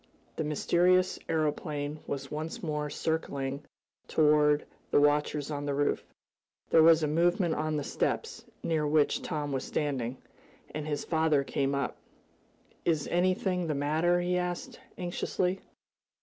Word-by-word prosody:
The - - -1
mysterious 180 +4 +2
aeroplane 150 -1 -1
was 140 -1 -4
once 155 +4 -5
more 150 -2 -2
circling 140 -3 -2 0.4
toward 150 -1 +4 0.2
the - - +4
watchers 145 0 +2
on 145 0 -3
the 140 - 0
roof. 145 +1 +1 0.7
There 165 - +7
was 165 0 +6
a - - +2
movement 170 +2 +2
on 155 0 -1
the 145 - -2
steps, 460 - -2 0.2
near 155 -2 +1
which 150 0 +2
Tom 145 -2 -3
was 135 -1 -1
standing, 130 -4 -2 0.6
and 155 0 -4
his 145 -1 -2
father 160 -3 +2
came 140 0 -1
up. 140 -2 -2 0.9
"Is 160 -4 +1
anything 180 0 +1
the 155 - -1
matter?" 160 +5 +2
he 180 0 +1
asked 180 0 -4 0.2
anxiously. 180 +1 -1
155 Hz, 135 wpm, -30 LUFS, 145-170 Hz, 0.9 s, There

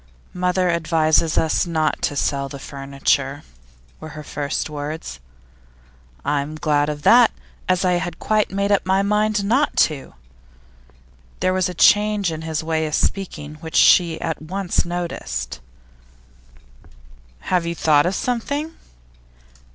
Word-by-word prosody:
'Mother 180 0 +1
advises 160 -1 +2
us 160 +2 +1
not 160 -2 0
to 145 - -1
sell 140 -1 -1
the 140 - -7
furniture,' 140 +1 -2 0.6
were 155 - -8
her 150 - -7
first 145 0 -3
words. 150 - -6 1.1
'I'm 145 +1 -1
glad 150 -1 +1
of 145 -1 -5
that, 240 +4 +7 0.4
as 185 0 +2
I 180 - +3
had 175 -2 -5
quite 215 -1 +1
made 200 +1 -1
up 200 - +3
my 190 +1 +2
mind 210 0 +1
not 260 +8 +1
to.' 145 - +1 1.2
There 185 0 +1
was 185 -1 +1
a 180 - -7
change 205 0 +4
in 160 0 -5
his 160 -1 -3
way 160 -1 -1
of 150 - -2
speaking 155 -6 -2
which 160 -1 -7
she 170 -3 +5
at 160 -2 -3
once 180 +3 -1
noticed. 70 - -4 1.8
'Have 175 -2 0
you 170 - -2
thought 150 -1 +3
of 190 - -1
something? 285 +8 -2
165 Hz, 135 wpm, -21 LUFS, 150-190 Hz, 1.8 s, that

